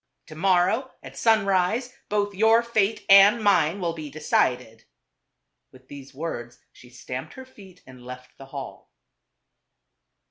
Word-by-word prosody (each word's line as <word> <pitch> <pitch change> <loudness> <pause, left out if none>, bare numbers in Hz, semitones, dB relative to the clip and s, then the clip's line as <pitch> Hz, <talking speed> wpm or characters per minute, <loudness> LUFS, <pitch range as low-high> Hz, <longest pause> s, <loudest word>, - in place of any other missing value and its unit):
To 155 - -13
morrow 190 - +1
at - - -12
sunrise, 215 +2 +1 0.2
both 205 -1 -1
your 220 +4 +3
fate 220 -2 -1
and 200 +3 +6
mine 185 -3 +2
will 170 -3 -2
be 155 -2 -8
decided." 125 -6 -2 0.9
With 130 0 -20
these 140 -1 -11
words 130 -5 -7
she 125 - -18
stamped 125 +1 -8
her 265 - -10
feet 195 -8 -18
and 130 -1 -15
left 125 0 -11
the 135 - -12
hall. 135 -1 -9
180 Hz, 135 wpm, -24 LUFS, 130-205 Hz, 0.9 s, and